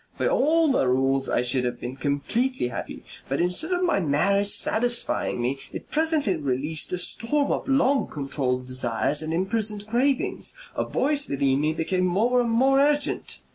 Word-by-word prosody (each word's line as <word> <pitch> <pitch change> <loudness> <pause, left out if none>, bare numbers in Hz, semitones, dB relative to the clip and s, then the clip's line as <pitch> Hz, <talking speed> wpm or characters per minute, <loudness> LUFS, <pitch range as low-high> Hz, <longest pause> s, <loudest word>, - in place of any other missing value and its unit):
By - - 0
all 325 - +2
the 135 - +1
rules 135 +1 +1
I - - +1
should 125 +1 +2
have 120 -1 -3
been 125 +2 -6
completely 145 - -1
happy. - - -7 0.3
But 135 - -1
instead 180 - 0
of 360 0 0
my 350 - +2
marriage 200 +6 +1
satisfying 240 - +1
me, 125 +3 -2
it - - -9
presently 310 - +1
released 145 +2 -1
a 180 - -1
storm 230 +10 0
of - - -2
long 275 0 +2
controlled 135 -3 -2
desires 130 +3 +1
and 155 0 -4
imprisoned 205 +4 0
cravings. 255 - 0 0.2
A - - -1
voice 290 +1 -1
within 140 0 +1
me 155 +1 0
became 180 +3 -1
more 235 +8 +2
and 235 - -1
more 265 +4 +3
urgent. 290 +1 0
190 Hz, 170 wpm, -24 LUFS, -, 0.3 s, more